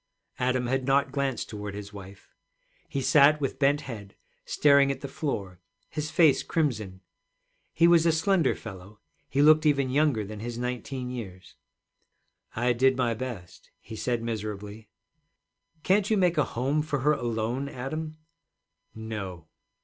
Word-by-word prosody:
Adam 125 0 +1
had 130 +1 -1
not 140 +1 +2
glanced 140 -4 -2
toward 105 -2 -6
his 105 0 -8
wife. 100 -1 -12 0.6
He 140 - -2
sat 150 +3 +5
with 135 -2 -3
bent 145 +1 +3
head, 105 -8 -9 0.3
staring 140 -1 +4
at 135 0 -6
the 140 - -5
floor, 100 - -4 0.3
his 155 -1 -3
face 160 -4 +4
crimson. 110 - -2 0.7
He 170 - +4
was 170 -1 +5
a - - +5
slender 165 -1 +2
fellow, 100 -1 -11 0.3
he 140 +1 +2
looked 155 +1 +6
even 140 -4 +2
younger 140 -6 +2
than 105 +1 -8
his 120 +2 -5
nineteen 125 +1 -4
years. 95 -7 -8 1.0
'I 120 +2 +2
did 130 +2 +3
my 120 -2 +1
best,' 115 -7 -8
he 110 - -10
said 120 +1 -2
miserably. 105 -1 -5 0.9
'Can't 195 +1 +2
you 220 - +3
make 175 -4 +2
a 145 - +3
home 135 +5 -1
for 150 -3 -2
her 150 +3 +3
alone, 120 +1 -2
Adam?' 155 +4 -5 0.8
'No.' 105 -7 -6
130 Hz, 150 wpm, -27 LUFS, 110-145 Hz, 1.0 s, looked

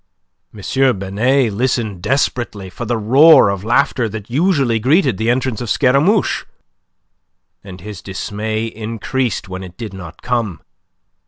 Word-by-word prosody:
M. 130 +4 0
Binet 110 +5 +1
listened 110 -4 -1
desperately 120 -6 -1
for 120 - -6
the 120 +1 -1
roar 130 +4 +6
of 100 -1 -3
laughter 120 0 +1
that 110 +1 -8
usually 140 -6 +1
greeted 130 - +2
the 110 +1 0
entrance 125 -2 -1
of 120 - -5
Scaramouche, 145 - +2 1.2
and 95 -2 -11
his 105 -1 -8
dismay 110 +3 -4
increased 115 +2 -3
when 95 0 -6
it 90 -1 -11
did 110 -5 -7
not 90 -4 -10
come. 115 - -2
115 Hz, 135 wpm, -17 LUFS, 100-130 Hz, 1.2 s, roar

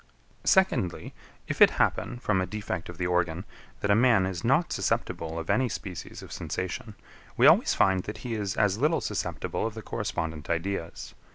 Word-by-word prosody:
15. - - -25
Secondly. 160 - +2 0.3
If - - -4
it - - +10
happen, 120 - +1
from 105 -6 0
a 95 - -2
defect 100 -4 -4
of 90 - -9
the 90 - -2
organ, 90 0 0 0.4
that 100 - +1
a - - +6
man 115 -4 +4
is 95 0 -4
not 135 +8 +2
susceptible 80 0 -2
of 80 0 -5
any 130 -1 +2
species 95 -4 -7
of - - -11
sensation, 95 +3 -4 0.4
we - - +5
always - - +6
find 95 -1 +3
that 105 - -6
he 120 - -2
is 100 -3 -3
as 105 -1 +2
little 155 +5 +2
susceptible - - -2
of 115 - -7
the 110 - -7
correspondent 80 -5 -4
ideas. 85 +1 -3
95 Hz, 185 wpm, -27 LUFS, 90-115 Hz, 0.4 s, it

